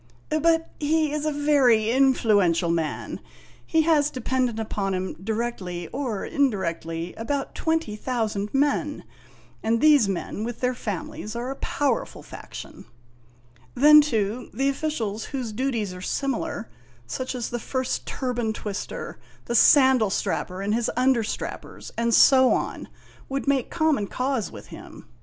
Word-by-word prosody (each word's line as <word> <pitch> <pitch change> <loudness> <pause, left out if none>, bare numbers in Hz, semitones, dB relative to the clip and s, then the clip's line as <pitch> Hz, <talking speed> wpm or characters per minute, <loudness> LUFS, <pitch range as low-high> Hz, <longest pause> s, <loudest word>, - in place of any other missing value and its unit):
" 120 - -32
But 325 +1 +2
he 310 0 +1
is 300 0 -2
a - - +1
very 270 -7 +3
influential 210 -10 +3
man; 160 -3 -2 0.4
he 320 -1 +2
has 300 -3 +3
dependent 255 -3 -1
upon 200 -3 -2
him, 185 0 -3
directly 200 -6 -3
or 250 -7 -3
indirectly, 170 - -1
about 275 +5 -3
twenty 320 -10 -1
thousand 215 -3 -2
men, 290 +1 0 0.6
and 230 +1 +1
these 290 -7 +5
men, 195 +2 -3
with 235 0 -5
their 250 0 +1
families, 210 -1 -5
are 245 +3 -3
a - - -5
powerful 275 -5 -1
faction. - - -10 0.9
Then, 300 +3 +8
too, 230 -4 -1
the 270 +1 +2
officials 245 -8 -2
whose 255 -5 -4
duties 225 -4 -2
are 180 - -9
similar 255 0 -2 0.4
such 255 - -4
as 245 -2 -4
the 240 - -2
First 260 +2 -3
Turban 245 -4 -2
Twister, 205 -2 -6 0.3
the 235 - -3
Sandal 260 -3 +6
Strapper 190 0 -2
and 205 +1 0
his 235 0 0
understrappers, 250 -3 -1
and 235 0 0
so 260 +2 +6
on - - -3 0.4
would 275 +1 -3
make 275 -3 +1
common 315 -11 +1
cause 255 -3 -2
with - - -11
him. - - -11
240 Hz, 140 wpm, -25 LUFS, 210-275 Hz, 0.9 s, Then